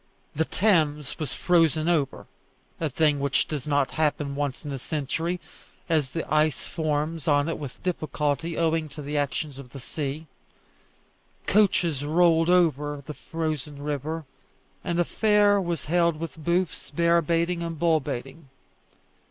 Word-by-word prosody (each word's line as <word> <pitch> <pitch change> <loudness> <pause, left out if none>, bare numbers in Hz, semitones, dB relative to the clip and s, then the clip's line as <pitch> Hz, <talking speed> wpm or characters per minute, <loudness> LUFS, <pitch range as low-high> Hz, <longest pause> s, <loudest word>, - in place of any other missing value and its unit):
The 160 +2 +1
Thames 155 -9 +1
was 150 -4 -3
frozen 165 -3 +3
over 155 -6 0 0.5
a 160 - 0
thing 150 +1 +2
which 140 -1 +1
does 150 -3 -4
not 145 -2 +2
happen 150 -2 0
once 145 0 -3
in 145 - -4
a 135 - -4
century, 160 +5 -2 0.5
as 155 -6 +1
the 165 +4 -3
ice 155 -2 +2
forms 155 0 -2
on 145 0 +3
it 165 - -2
with 140 -4 -8
difficulty 160 -2 -1
owing 160 -1 +1
to 150 +1 -8
the 145 +2 -4
action 145 +1 -1
of 130 -2 -10
the 135 - -9
sea. 145 +4 -4 1.2
Coaches 175 -8 +2
rolled 165 +2 +4
over 150 -5 +2
the 150 - -6
frozen 150 -3 -4
river, 150 +2 -3 0.6
and 175 -2 -1
a 175 - +3
fair 205 -1 +3
was 170 -3 -3
held 170 0 +2
with 165 -1 -6
booths, 175 +2 0
bear 170 0 +3
baiting, 170 +2 0
and 165 -1 -4
bull 165 -1 +3
baiting. 135 +2 -6
155 Hz, 150 wpm, -26 LUFS, 145-170 Hz, 1.2 s, rolled